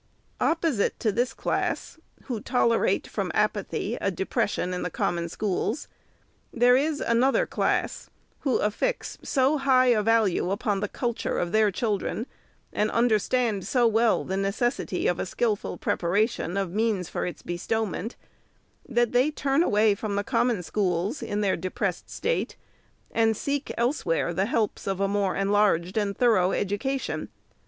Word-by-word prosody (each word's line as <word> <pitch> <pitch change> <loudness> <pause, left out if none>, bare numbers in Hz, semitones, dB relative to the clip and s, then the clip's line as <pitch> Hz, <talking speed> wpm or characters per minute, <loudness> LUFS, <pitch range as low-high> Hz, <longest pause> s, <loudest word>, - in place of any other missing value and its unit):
Opposite 320 -10 +1
to 220 - +2
this 245 +4 0
class, - - -2 0.2
who 240 -5 -4
tolerate, 235 -1 +2
from - - -3
apathy, - - -1
a - - +1
de - - -3
pression 180 +1 -1
in 180 - -3
the 180 - -2
Common 170 0 -1
Schools, 210 - -2 0.6
there 245 +1 +5
is 295 +3 +1
another 260 - +3
class, - - -1 0.3
who 265 -4 +1
affix 450 - -1
so 275 +3 +2
high 260 -2 +4
a 215 - +2
value 215 -5 +2
upon 200 0 0
the 205 - -1
culture 235 +2 -2
of 175 - -1
their 215 0 +4
chil 210 0 -1
dren, 225 - -3 0.5
and 210 +1 +1
understand 225 -3 +1
so 245 0 +3
well 225 0 +3
the 190 - -3
necessity 195 +1 -1
of 175 - +1
a - - -1
skilful 215 +1 -1
preparation 195 +1 0
of 195 -3 -1
means 210 -4 0
for - - -3
its 170 -4 -7
bestowment, 220 +5 -2 0.7
that 240 -1 +2
they 250 +4 +3
turn 285 -1 +1
away 210 -8 +3
from 200 0 -4
the 205 - 0
Common 230 -3 +1
Schools, 195 - -1
in 205 0 -2
their 200 -2 +2
depressed 185 +1 -3
state, 480 +1 -2 0.6
and 225 -1 +2
seek, 285 0 -2
elsewhere, 230 - 0
the 190 +3 +1
helps 220 -3 -1
of 195 -1 -1
a 195 - +2
more 200 -1 0
enlarged 195 -3 +2
and 205 -2 -1
thorough 210 -7 +3
education. 235 +7 -2
215 Hz, 155 wpm, -26 LUFS, 195-245 Hz, 0.7 s, there